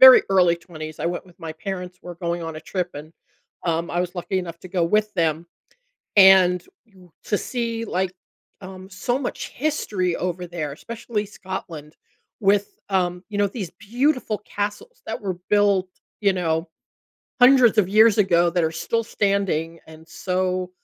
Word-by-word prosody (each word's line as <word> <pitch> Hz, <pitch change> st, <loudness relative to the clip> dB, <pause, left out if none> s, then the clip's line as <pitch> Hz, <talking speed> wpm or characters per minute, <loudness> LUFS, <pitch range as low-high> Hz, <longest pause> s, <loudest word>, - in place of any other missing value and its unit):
very 260 Hz, -1 st, +11 dB
early 180 Hz, -3 st, +4 dB
20s, 155 Hz, -3 st, -9 dB
I -, -, 0 dB
went 175 Hz, +2 st, -3 dB
with 180 Hz, -2 st, -20 dB
my 165 Hz, -2 st, -5 dB
parents, 180 Hz, +2 st, -6 dB
were 175 Hz, -1 st, -8 dB
going 170 Hz, 0 st, -2 dB
on 165 Hz, -1 st, -5 dB
a -, -, -7 dB
trip, 180 Hz, +2 st, -3 dB
and, 150 Hz, +3 st, -9 dB, 0.5 s
um, 170 Hz, -1 st, 0 dB
I 175 Hz, -, 0 dB
was 180 Hz, 0 st, -3 dB
lucky 185 Hz, +2 st, -1 dB
enough 170 Hz, -2 st, -6 dB
to 185 Hz, -, -10 dB
go 180 Hz, -1 st, 0 dB
with 210 Hz, +4 st, +1 dB
them, 165 Hz, -2 st, 0 dB, 0.7 s
and 190 Hz, -2 st, +7 dB, 0.2 s
you 190 Hz, -5 st, -20 dB
to 205 Hz, -, +1 dB
see, 230 Hz, -2 st, -3 dB
like, 190 Hz, -3 st, -1 dB, 0.5 s
um, 190 Hz, -1 st, -10 dB
so 240 Hz, +7 st, -1 dB
much 260 Hz, -, -4 dB
history 210 Hz, -, -1 dB
over 180 Hz, 0 st, -3 dB
there, 165 Hz, -4 st, -4 dB
especially 225 Hz, +5 st, -4 dB
Scotland 175 Hz, -6 st, -7 dB, 0.4 s
with, 200 Hz, 0 st, +2 dB
um, 180 Hz, -2 st, 0 dB
you 210 Hz, -, -5 dB
know, 205 Hz, 0 st, +3 dB
these 195 Hz, -5 st, -5 dB
beautiful 245 Hz, 0 st, 0 dB
castles 205 Hz, -, -4 dB
that -, -, -4 dB
were 190 Hz, -3 st, -3 dB
built, 200 Hz, -2 st, +3 dB, 0.3 s
you 200 Hz, -2 st, +3 dB
know, 165 Hz, -2 st, -1 dB, 0.7 s
hundreds 245 Hz, -3 st, +7 dB
of 195 Hz, -4 st, +4 dB
years 215 Hz, +1 st, +5 dB
ago 175 Hz, -3 st, +4 dB
that 175 Hz, -1 st, +1 dB
are 160 Hz, -, 0 dB
still 230 Hz, +8 st, -1 dB
standing, 195 Hz, -7 st, 0 dB
and 160 Hz, 0 st, -14 dB
so, 185 Hz, 0 st, -1 dB
185 Hz, 165 wpm, -23 LUFS, 170-205 Hz, 0.7 s, very